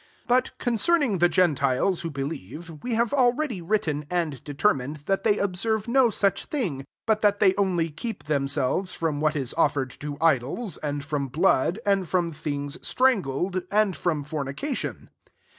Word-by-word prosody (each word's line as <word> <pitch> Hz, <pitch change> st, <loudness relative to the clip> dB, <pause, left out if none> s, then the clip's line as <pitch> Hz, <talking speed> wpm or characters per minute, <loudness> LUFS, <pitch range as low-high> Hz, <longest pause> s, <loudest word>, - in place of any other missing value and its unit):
25 -, -, -34 dB
But 250 Hz, +1 st, +1 dB
con 245 Hz, -, -1 dB
cerning 280 Hz, -, +2 dB
the 175 Hz, +1 st, +5 dB
gentiles 165 Hz, 0 st, +2 dB
who 165 Hz, -, -3 dB
be 140 Hz, -3 st, -4 dB
lieve, 155 Hz, -, -7 dB
we 245 Hz, -2 st, -1 dB
have 230 Hz, +1 st, +1 dB
already 250 Hz, -, +1 dB
written 160 Hz, -6 st, -1 dB
and 165 Hz, -8 st, -2 dB
determined, 145 Hz, -2 st, 0 dB
[that 195 Hz, 0 st, +1 dB
they 210 Hz, -2 st, +2 dB
ob 195 Hz, -2 st, -1 dB
serve 220 Hz, +2 st, 0 dB
no 250 Hz, 0 st, +4 dB
such 200 Hz, -2 st, +1 dB
thing; 180 Hz, -, -2 dB, 0.2 s
but^ 220 Hz, -1 st, +2 dB
that 205 Hz, -1 st, +3 dB
they 195 Hz, -2 st, +4 dB
only 175 Hz, -5 st, +1 dB
keep 220 Hz, +8 st, -6 dB
themselves 145 Hz, +4 st, -1 dB
from 155 Hz, -3 st, -1 dB
what 155 Hz, 0 st, +2 dB
is 135 Hz, -5 st, -3 dB
offered 135 Hz, -3 st, +2 dB
to 145 Hz, -1 st, -5 dB
idols, 160 Hz, -, +1 dB
and 145 Hz, -1 st, -4 dB
from 145 Hz, -2 st, -2 dB
blood, 165 Hz, +3 st, +2 dB
[and 195 Hz, -3 st, +2 dB
from 175 Hz, -2 st, +1 dB
things 145 Hz, 0 st, -4 dB
strangled,] 185 Hz, -, +1 dB
and 205 Hz, -2 st, +2 dB
from 155 Hz, -5 st, -1 dB
fornica 150 Hz, -, -3 dB
tion." -, -, -5 dB
170 Hz, 175 wpm, -25 LUFS, 145-210 Hz, 0.2 s, the